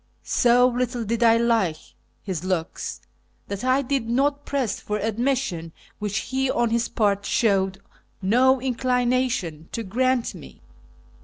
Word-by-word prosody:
So 245 0 +4
little 245 -1 -1
did 230 +2 -2
I 230 -1 +6
like 225 -9 +2 0.5
his 185 -5 -4
looks 185 -3 -3 0.5
that 200 +2 -5
I 260 +2 +2
did 255 -3 -1
not 280 +4 +1
press 270 -6 -1
for 210 - -3
admission, 220 -6 -1 0.3
which 210 -1 -2
he 265 0 +1
on 240 -3 +1
his 235 0 +1
part 205 -2 +1
showed 195 -3 +1 0.4
no 250 +7 +4
inclina 255 0 +1
tion 160 -7 -4
to 230 - -3
grant 250 +4 0
me. 65 - -13
235 Hz, 140 wpm, -24 LUFS, 200-255 Hz, 0.5 s, I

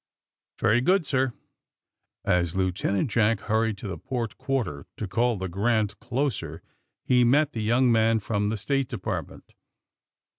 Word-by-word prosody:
'" - - -67
''Very 120 +4 +3
good, 185 +2 +3
sir." 130 -2 +1 0.9
As 85 -1 +1
Lieutenant 95 +4 0
Jack 110 -2 +2
hurried 110 -1 0
to 100 - -7
the 95 - -5
port 120 -4 -4
quar 135 -2 0
ter 75 -7 -8
to 105 - -4
call 120 +3 +1
the 95 0 -3
"Grant" 105 +3 0
closer, 125 +1 -3 0.4
he 125 -1 +4
met 145 +5 +3
the 110 - -3
young 120 +3 +3
man 115 0 +4
from 105 -1 -1
the 110 - -2
State 135 +5 0
Department. - - -5
115 Hz, 155 wpm, -26 LUFS, 100-125 Hz, 0.9 s, he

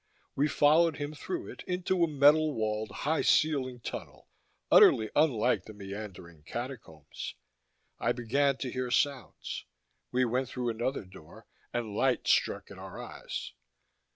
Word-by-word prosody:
We 145 +2 +2
followed 155 +2 +4
him 145 +1 -4
through 350 - -5
it - - -10
into 180 0 0
a - - +4
metal 150 0 +4
walled, 110 -1 -1
high 150 +10 -1
ceilinged 130 -6 +2
tunnel, - - -7 0.4
utterly 110 -1 +7
unlike 120 - +2
the 110 - -11
meandering 95 -5 -8
Catacombs. 115 - -7 0.6
I - - +1
began 135 +3 +1
to 130 -2 -4
hear 130 0 -2
sounds; 140 0 -1 0.5
we 125 +1 +2
went 125 +2 -1
through 125 -2 -2
another 120 +1 -2
door, 85 -4 -14 0.3
and 115 -3 -3
light 130 +2 +1
struck - - +1
at - - -10
our - - -9
eyes. - - -6
130 Hz, 140 wpm, -30 LUFS, 110-145 Hz, 0.6 s, utterly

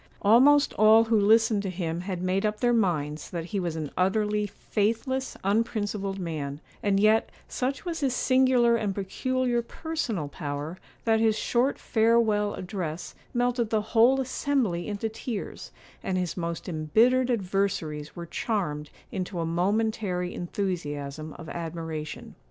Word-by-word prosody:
Almost 275 +8 +6
all 215 +1 +7
who 230 0 +1
listened 220 0 +4
to 195 - -3
him 170 -2 -3
had 180 -1 -4
made 185 +1 +1
up 210 0 -1
their 240 -1 +3
minds 155 -9 0
that 170 -2 -4
he 200 +3 -3
was 170 -3 -2
an 155 -3 -4
utterly 210 +2 +1
faithless, 230 +7 -2
unprincipled 205 -1 0
man; 150 -6 -4 0.2
and 200 -1 +2
yet, 215 +2 +4 0.2
such 265 +5 -2
was 335 -2 -3
his 270 -4 0
singular 255 -2 +4
and 210 -4 -1
peculiar 245 +5 0
personal 235 - -3
power, 145 +4 -5 0.3
that 225 -1 +3
his 220 -1 +3
short 245 +5 +1
farewell 220 -2 +2
address 180 -4 -5 0.2
melted 245 -2 0
the 220 -1 +1
whole 245 +4 +5
assembly 255 -9 0
into 210 +1 -2
tears; 220 0 -6 0.3
and 185 - -1
his 180 -2 -2
most 170 -2 -4
embittered 225 +11 +3
adversaries 185 -8 -1
were 170 - -6
charmed 165 -6 -2 0.2
into 185 -1 -4
a 165 - 0
momentary 185 +1 0
enthusiasm 155 -5 -4
of 165 - -9
admiration. 160 -2 -5
205 Hz, 140 wpm, -27 LUFS, 170-230 Hz, 0.3 s, all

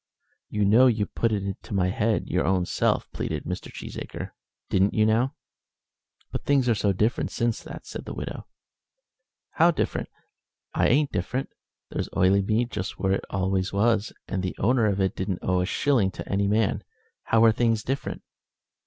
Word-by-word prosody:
"You 105 -1 +1
know 115 +6 +6
you 110 -4 +2
put 115 +2 -1
it 100 -2 0
into 100 +1 -5
my 90 -1 +2
head 110 +2 0
your - - +1
own 95 -1 +2
self," - - +1
pleaded - - -3
Mr. - - -5
Cheesacre. - - -7 0.4
"Didn't 95 +1 +2
you, 110 - +4
now?" 115 +5 +2 1.0
"But - - -4
things 140 -3 +2
are 120 - +4
so 100 -1 +1
different 105 +5 0
since 120 -2 -1
that," - - -9
said - - -7
the - - -6
widow. - - -6 1.0
"How 170 +2 +4
different? 170 - -1 0.6
I - - +3
ain't 145 +2 +3
different. 125 +9 -2 0.4
There's - - -3
Oileymead 100 +5 +3
just 90 - -4
where 95 - 0
it 95 - -2
always 95 0 0
was, 110 +1 +2 0.2
and 95 - -2
the 90 -1 -3
owner 115 +1 +3
of 100 -1 0
it 95 -1 +1
don't 95 -1 -2
owe 90 -1 +2
a 90 - -1
shilling 120 -4 +2
to - - -7
any 100 0 +1
man. 105 0 +1 0.4
How 115 0 +4
are 115 - +7
things 115 -1 +1
different?" 135 +2 -3
105 Hz, 175 wpm, -26 LUFS, 95-115 Hz, 1.0 s, are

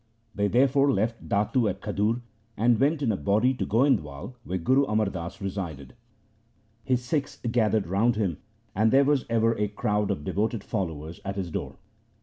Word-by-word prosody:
They 105 0 +1
therefore 135 +5 +3
left 115 +2 -2
Datu 105 +3 +2
at 95 0 -4
Khadur 110 +5 -1 0.3
and 115 +1 +3
went 145 +2 +2
in 115 - +2
a - - 0
body 105 - +2
to 130 - -3
Goindwal, 105 - +1
where 95 -4 -3
Guru 130 +11 +3
Amar 105 -3 +1
Das 90 -1 -5
resided. 90 -8 -5 0.9
His 125 -2 0
Sikhs 140 +1 -2
gathered 110 -3 +2
round 105 +7 +2
him, 95 -8 -1 0.4
and 110 +3 +2
there 135 +1 +5
was 145 -2 +1
ever 115 0 +2
a 105 - +1
crowd 105 0 -1
of 75 - -2
devoted 105 +4 -1
followers 80 -6 -4
at 100 0 -4
his 95 -4 -4
door. - - -4
105 Hz, 170 wpm, -26 LUFS, 95-125 Hz, 0.9 s, there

